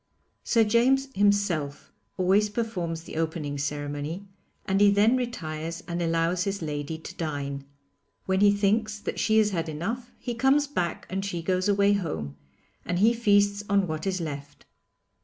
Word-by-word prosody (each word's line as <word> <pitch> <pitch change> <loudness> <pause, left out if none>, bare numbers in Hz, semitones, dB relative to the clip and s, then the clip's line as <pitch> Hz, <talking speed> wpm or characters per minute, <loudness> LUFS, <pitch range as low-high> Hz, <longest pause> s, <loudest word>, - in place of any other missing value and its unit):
Sir 230 -2 +3
James 255 +5 +3
himself 195 - +1 0.3
always 195 +3 +3
performs 180 -7 -3
the 170 - -8
opening 160 -3 -2
ceremony, 145 +5 -3 0.4
and 195 +1 +1
he 205 - +7
then 205 +4 +4
retires 165 -9 -4
and 175 0 -3
allows 165 +2 +1
his 195 -2 -3
lady 150 +1 -3
to 160 - -10
dine. 140 -3 -4 0.6
When 190 0 +1
he 205 0 +6
thinks 210 +2 +1
that 205 - -5
she 220 0 +3
has 215 -1 +4
had 165 -3 -2
enough 225 +11 -4
he 245 - -4
comes 270 +5 +3
back 180 - -3
and 195 +1 -3
she 175 -4 -3
goes 185 +2 +1
away 200 0 +4
home, 80 - -3 0.5
and 175 - -2
he 220 +5 +5
feasts 205 -3 +3
on 200 -1 +3
what 155 +1 -4
is 190 -1 0
left. 145 -3 -7
190 Hz, 160 wpm, -27 LUFS, 160-205 Hz, 0.6 s, he